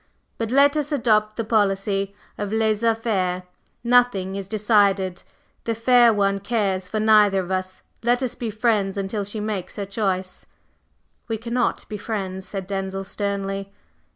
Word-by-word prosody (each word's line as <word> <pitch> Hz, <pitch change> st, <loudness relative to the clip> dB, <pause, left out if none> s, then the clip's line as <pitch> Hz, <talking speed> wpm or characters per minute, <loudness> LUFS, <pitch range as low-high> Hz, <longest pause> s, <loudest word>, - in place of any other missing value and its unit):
But 225 Hz, -1 st, -1 dB
let 280 Hz, +3 st, +5 dB
us 300 Hz, 0 st, -1 dB
adopt 215 Hz, -6 st, +2 dB
the 230 Hz, -, -2 dB
policy 200 Hz, -2 st, 0 dB, 0.2 s
of 205 Hz, -1 st, -4 dB
laissez 220 Hz, +1 st, +2 dB
faire. 185 Hz, -5 st, -1 dB, 0.4 s
Nothing 235 Hz, -6 st, +3 dB
is 195 Hz, -1 st, -5 dB
decided; 200 Hz, -3 st, +2 dB, 0.4 s
the 230 Hz, -, -1 dB
fair 240 Hz, +1 st, +5 dB
one 200 Hz, -2 st, +1 dB
cares 195 Hz, -3 st, -1 dB
for 215 Hz, -, -2 dB
neither 210 Hz, -2 st, +5 dB
of 185 Hz, 0 st, -7 dB
us; 185 Hz, 0 st, -3 dB, 0.2 s
let 245 Hz, +2 st, +2 dB
us 250 Hz, -, -2 dB
be 235 Hz, -, -4 dB
friends 215 Hz, -3 st, 0 dB
until 200 Hz, +1 st, -2 dB
she 205 Hz, +2 st, -5 dB
makes 210 Hz, -4 st, -4 dB
her 200 Hz, -, -3 dB
choice." 190 Hz, -2 st, -3 dB, 0.8 s
"We 225 Hz, -1 st, -2 dB
cannot 235 Hz, +3 st, -1 dB
be 210 Hz, -2 st, -6 dB
friends," 190 Hz, -3 st, -4 dB
said 195 Hz, -2 st, -5 dB
Denzil, 195 Hz, 0 st, -3 dB
sternly. 195 Hz, 0 st, -3 dB
205 Hz, 155 wpm, -23 LUFS, 195-225 Hz, 0.8 s, let